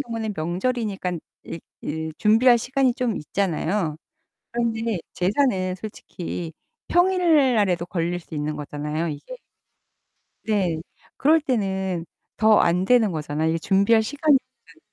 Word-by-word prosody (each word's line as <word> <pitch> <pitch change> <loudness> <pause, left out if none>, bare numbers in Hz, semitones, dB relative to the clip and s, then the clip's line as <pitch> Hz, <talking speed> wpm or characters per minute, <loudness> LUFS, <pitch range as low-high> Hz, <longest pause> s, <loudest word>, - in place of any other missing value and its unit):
경우에는 225 -5 -4
명절이니깐 185 +1 -2 0.3
이 165 - -6 0.2
이 160 +1 -3
준비할 235 +3 +5
시간이 260 +2 +1
좀 245 -5 -1
있잖아요. 170 0 -1 0.6
그런데 230 -3 -1
제사는 185 -2 +1
솔직히 180 -4 -6 0.4
평일 345 -7 +4
날에도 180 -5 +1
걸릴 175 0 -2
수 165 - -11
있는 150 +1 -2
거잖아요 150 +2 -3
이게. 165 - -7 1.1
네. 195 -7 0 0.4
그럴 315 +3 +4
때는 190 - -1 0.3
더 220 -1 +5
안 180 +2 +2
되는 225 -2 +4
거잖아요. 155 0 -1
이게 165 - +1
준비할 200 +6 +3
시간이 290 +5 +2 0.3
없으 - - -19
200 Hz, 280 characters per minute, -23 LUFS, 170-240 Hz, 1.1 s, 준비할